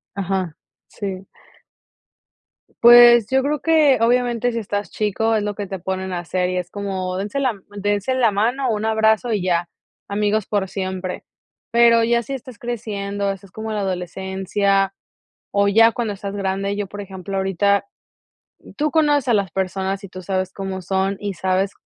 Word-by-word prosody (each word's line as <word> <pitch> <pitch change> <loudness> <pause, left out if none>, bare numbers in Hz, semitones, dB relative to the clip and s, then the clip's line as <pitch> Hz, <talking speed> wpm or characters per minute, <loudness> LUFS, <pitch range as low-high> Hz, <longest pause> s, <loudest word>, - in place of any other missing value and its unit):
Ajá. 190 -4 -2 0.3
Sí. 195 -1 -6 1.6
Pues, 240 -2 +8
yo 265 0 +3
creo 295 +1 0
que, 310 -4 +4
obviamente, 245 0 +2
si 230 - -2
estás 205 -1 -3
chico, 220 +2 0
es 215 - 0
lo 205 0 -3
que 205 -1 -5
te 190 0 -5
ponen 190 +1 -3
a 175 - -2
hacer, 180 +1 -1
y 185 - -2
es 180 -1 -3
como, 190 -2 -3
dense 205 +7 -3
la 265 -2 +2
m 200 -3 -13 0.2
dense 205 +4 0
la 240 -4 +3
mano, 240 +6 0
un 215 0 -2
abrazo 220 +2 +2
y 205 - 0
ya, 175 -1 0 0.4
amigos 210 +1 0
por 200 -2 0
siempre, 185 -1 -4 0.5
pero 235 0 +5
ya 235 +1 +2
si 275 - -6
estás 255 -4 -8
creciendo, 205 -4 -3
haces 195 -1 -5
como 220 +3 -6
la 215 - -2
adolescencia, 190 +1 -1 0.6
o 200 0 +2
ya 225 +3 +6
cuando 225 -2 -2
estás 200 0 -6
grande, 195 0 -2
yo, 205 -1 -3
por 205 +2 -7
ejemplo, 195 0 -6
ahorita, 195 +1 +1 0.9
tú 305 -1 0
conoces 295 -4 +2
a - - +4
las 200 -5 +1
personas 190 +1 -2
y 200 - -8
tú 185 0 -9
sabes 185 0 -2
cómo 190 -1 -5
son 190 +1 -1
y 205 -1 -3
sabes 190 +2 0
200 Hz, 175 wpm, -21 LUFS, 190-225 Hz, 1.6 s, Pues